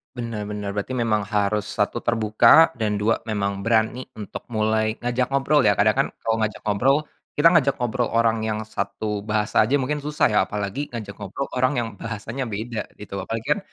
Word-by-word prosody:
Bener 115 Hz, -4 st, -4 dB
bener, 105 Hz, -1 st, -4 dB
berarti 105 Hz, +5 st, -3 dB
memang 110 Hz, -4 st, +1 dB
harus 105 Hz, 0 st, 0 dB
satu 105 Hz, +3 st, -1 dB
terbuka, 115 Hz, +7 st, +5 dB
dan 105 Hz, -2 st, 0 dB
dua 115 Hz, +2 st, +2 dB
memang 100 Hz, -2 st, -1 dB
berani 115 Hz, +3 st, +1 dB
untuk 105 Hz, -3 st, -8 dB
mulai 110 Hz, 0 st, +1 dB
ngajak 120 Hz, +1 st, 0 dB
ngobrol 140 Hz, +2 st, +3 dB
ya, 100 Hz, -, +5 dB
kadang 105 Hz, +2 st, +4 dB
kan -, -, +3 dB, 0.2 s
kalau 115 Hz, 0 st, +1 dB
ngajak 110 Hz, -1 st, -2 dB
ngobrol, 120 Hz, +7 st, +3 dB, 0.4 s
kita 160 Hz, +3 st, +6 dB
ngajak 140 Hz, -5 st, +3 dB
ngobrol 120 Hz, -1 st, -1 dB
orang 115 Hz, -1 st, +2 dB
yang 110 Hz, -1 st, -2 dB
satu 105 Hz, 0 st, -3 dB
bahasa 105 Hz, 0 st, +1 dB
aja 130 Hz, +7 st, +3 dB
mungkin 145 Hz, +2 st, -2 dB
susah 150 Hz, +1 st, 0 dB
ya, -, -, +4 dB
apalagi 105 Hz, +8 st, -3 dB
ngajak 110 Hz, -4 st, -6 dB
ngobrol 100 Hz, +8 st, -4 dB
orang 130 Hz, +2 st, +2 dB
yang 120 Hz, -1 st, 0 dB
bahasanya 115 Hz, +3 st, -4 dB
beda 110 Hz, +2 st, -4 dB, 0.2 s
gitu, 105 Hz, -1 st, -10 dB
apalagi 115 Hz, +5 st, -5 dB
kan -, -, -6 dB
110 Hz, 185 wpm, -23 LUFS, 105-125 Hz, 0.4 s, kita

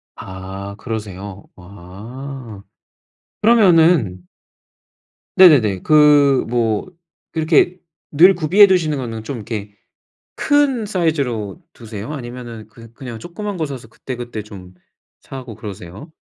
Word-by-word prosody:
아. 95 Hz, +1 st, -8 dB
그러세요? 100 Hz, -4 st, -7 dB
아. 105 Hz, +6 st, -10 dB, 0.8 s
그러면은 165 Hz, -, +4 dB, 1.1 s
네네네. 125 Hz, -, +6 dB
그 145 Hz, -3 st, +5 dB
뭐 115 Hz, -3 st, 0 dB, 0.5 s
이렇게 160 Hz, +3 st, +2 dB, 0.3 s
늘 175 Hz, +6 st, +6 dB
구비해 180 Hz, +5 st, +6 dB
두시는 165 Hz, -6 st, +1 dB
거는 115 Hz, -4 st, -5 dB
좀 135 Hz, +3 st, -5 dB
이렇게 105 Hz, -2 st, -6 dB, 0.6 s
큰 285 Hz, -6 st, +1 dB
사이즈로 140 Hz, -, -2 dB
두세요? 110 Hz, +1 st, -8 dB
아니면은 120 Hz, -4 st, -8 dB
그 115 Hz, +1 st, -16 dB
그냥 120 Hz, -4 st, -8 dB
조그만 195 Hz, -, -6 dB
거 160 Hz, -, -1 dB
사서 130 Hz, -5 st, -8 dB
그때 125 Hz, +3 st, -8 dB
그때 120 Hz, -3 st, -6 dB
좀 95 Hz, -3 st, -12 dB, 0.5 s
사고 130 Hz, -3 st, -9 dB
그러세요? 100 Hz, -, -10 dB
120 Hz, 235 characters per minute, -19 LUFS, 105-155 Hz, 1.1 s, 네네네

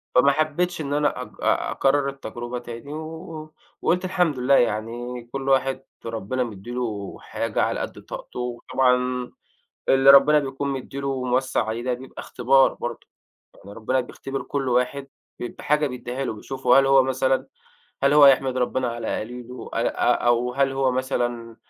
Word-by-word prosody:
فما 135 Hz, +3 st, +6 dB
حبيتش 155 Hz, +4 st, 0 dB
إن 145 Hz, -1 st, -3 dB
أنا 150 Hz, 0 st, +1 dB
أك -, -, -6 dB
آآ -, -, +1 dB
أكرر 140 Hz, 0 st, +2 dB
التجربة 120 Hz, -2 st, -6 dB
تاني، 120 Hz, +4 st, -8 dB
و 160 Hz, 0 st, -8 dB, 0.3 s
وقُلت 180 Hz, +2 st, +1 dB
الحمد 180 Hz, -7 st, +1 dB
لله، 130 Hz, +2 st, +4 dB
يعني 120 Hz, +1 st, -1 dB
كل 135 Hz, +1 st, -3 dB
واحد 135 Hz, 0 st, +2 dB, 0.2 s
ربنا 115 Hz, +3 st, -2 dB
مدّي 110 Hz, -1 st, -8 dB
له 110 Hz, -5 st, -4 dB
حاجة -, -, -2 dB
على -, -, -1 dB
قد -, -, -6 dB
طاقته، -, -, -8 dB
وطبعًا، 125 Hz, +1 st, 0 dB, 0.6 s
اللي 135 Hz, +1 st, +6 dB
ربنا 150 Hz, +2 st, +7 dB
بيكون 140 Hz, 0 st, -3 dB
مدّي 135 Hz, +1 st, -5 dB
له 140 Hz, -, -4 dB
وموسّع 130 Hz, -2 st, 0 dB
عليه، 110 Hz, +2 st, -3 dB
ده 125 Hz, 0 st, 0 dB
بيبقى 130 Hz, +2 st, -10 dB
اختبار 135 Hz, +2 st, +3 dB
برضه. -, -, -6 dB, 0.5 s
يعني 100 Hz, -, -13 dB
ربنا 115 Hz, +5 st, 0 dB
بيختبر 135 Hz, +2 st, -6 dB
كل 140 Hz, -2 st, -3 dB
واحد 125 Hz, +3 st, 0 dB, 0.3 s
ب -, -, -3 dB
بحاجة 150 Hz, +5 st, 0 dB
بيدّيها 125 Hz, 0 st, -4 dB
له، 125 Hz, -, -2 dB
بيشوفه 130 Hz, +4 st, +2 dB
هل 135 Hz, -, +4 dB
هو، 135 Hz, 0 st, +6 dB
مثلًا 130 Hz, 0 st, 0 dB, 0.6 s
هل 140 Hz, +1 st, +4 dB
هو 150 Hz, -1 st, +8 dB
هيحمد 135 Hz, -1 st, +5 dB
ربنا 125 Hz, 0 st, 0 dB
على 115 Hz, -1 st, -3 dB
قليله، 125 Hz, +2 st, -8 dB
آآ -, -, +1 dB
أ -, -, +2 dB
أو 120 Hz, +1 st, +2 dB
هل 135 Hz, 0 st, +2 dB
هو 135 Hz, -1 st, +1 dB
مثلًا 120 Hz, -3 st, -2 dB
130 Hz, 165 wpm, -24 LUFS, 120-140 Hz, 0.6 s, هو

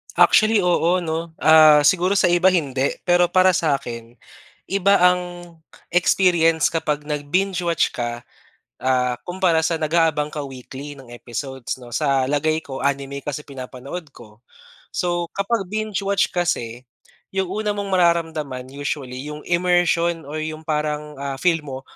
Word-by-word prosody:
Actually, 215 Hz, -3 st, +5 dB
oo 175 Hz, 0 st, +2 dB
'no, 160 Hz, 0 st, -4 dB
ah, 155 Hz, -2 st, +7 dB
siguro 185 Hz, +5 st, +3 dB
sa 175 Hz, -, +3 dB
iba 175 Hz, +1 st, +4 dB
hindi, 140 Hz, -7 st, +1 dB
pero 175 Hz, 0 st, +3 dB
para 185 Hz, +1 st, +4 dB
sakin, 120 Hz, -8 st, -2 dB, 0.5 s
iba 200 Hz, +1 st, +3 dB
ang 180 Hz, 0 st, +4 dB, 0.7 s
experience 170 Hz, -3 st, +3 dB
kapag 150 Hz, -2 st, -2 dB
nag 145 Hz, -1 st, -4 dB
binge 190 Hz, 0 st, 0 dB
watch 170 Hz, -3 st, 0 dB
ka, 120 Hz, -1 st, -4 dB, 0.6 s
ah, 125 Hz, -1 st, +1 dB
kumpara 175 Hz, -3 st, +1 dB
sa 160 Hz, 0 st, 0 dB
nag-aabang 155 Hz, -1 st, +1 dB
ka 150 Hz, -, -3 dB
weekly 135 Hz, +1 st, -9 dB
ng 120 Hz, -3 st, -13 dB
episodes 130 Hz, +2 st, -6 dB
'no. 120 Hz, -2 st, -10 dB
Sa 135 Hz, -2 st, +1 dB
lagay 150 Hz, +3 st, +1 dB
ko, 135 Hz, -1 st, -7 dB
anime 140 Hz, 0 st, -2 dB
kasi 150 Hz, +1 st, -5 dB
pinapanood 135 Hz, +4 st, -8 dB
ko. 115 Hz, -4 st, -17 dB, 0.5 s
So, 175 Hz, -1 st, -1 dB
kapag 200 Hz, 0 st, -1 dB
binge-watch 200 Hz, -2 st, -1 dB
kasi, 125 Hz, -9 st, -2 dB, 0.5 s
yung 190 Hz, -2 st, -1 dB
una 210 Hz, +1 st, -2 dB
mong 200 Hz, -1 st, -4 dB
mararamdaman 160 Hz, -8 st, 0 dB
usually 140 Hz, -2 st, -5 dB
yung 150 Hz, 0 st, -7 dB
immersion 175 Hz, -1 st, +1 dB
or 150 Hz, +3 st, -6 dB
yung 155 Hz, 0 st, -5 dB
parang, 150 Hz, -1 st, -3 dB
ah, 140 Hz, -1 st, -3 dB
feel 165 Hz, +2 st, +1 dB
mo 135 Hz, -1 st, -6 dB
155 Hz, 140 wpm, -21 LUFS, 140-175 Hz, 0.7 s, ah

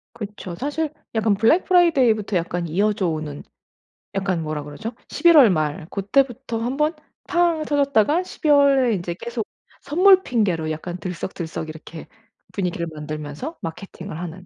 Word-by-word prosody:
그쵸. 205 Hz, -5 st, -7 dB
사실 290 Hz, -, -2 dB, 0.2 s
약간 220 Hz, -2 st, +2 dB
블랙 225 Hz, -, +3 dB
프라이데이부터 255 Hz, -, +3 dB
약간 175 Hz, 0 st, -2 dB
이어져 200 Hz, +3 st, +1 dB
오는 155 Hz, -2 st, -5 dB, 0.7 s
약간 190 Hz, -4 st, -1 dB
뭐라 155 Hz, -1 st, -3 dB
그러죠? 150 Hz, +11 st, -6 dB, 0.2 s
11 340 Hz, -2 st, +5 dB
월 260 Hz, -7 st, +8 dB
말 155 Hz, -3 st, -1 dB
고때부터 235 Hz, +3 st, 0 dB
한번 275 Hz, +7 st, 0 dB, 0.3 s
팡 340 Hz, -3 st, +2 dB
터졌다가 285 Hz, -, +2 dB
12 325 Hz, -3 st, -4 dB
월에 275 Hz, -4 st, +5 dB
이제 175 Hz, -3 st, -3 dB
계속 235 Hz, -2 st, -4 dB, 0.3 s
선물 370 Hz, +5 st, +5 dB
핑계로 180 Hz, -10 st, 0 dB
약간 175 Hz, +3 st, -5 dB
들썩들썩 170 Hz, -2 st, -5 dB
이렇게 160 Hz, +1 st, -10 dB, 0.5 s
분위기를 180 Hz, -3 st, -2 dB
만들면서 150 Hz, -, -6 dB
마케팅을 175 Hz, +1 st, -7 dB
하는 180 Hz, +1 st, -7 dB
205 Hz, 315 characters per minute, -22 LUFS, 170-275 Hz, 0.7 s, 월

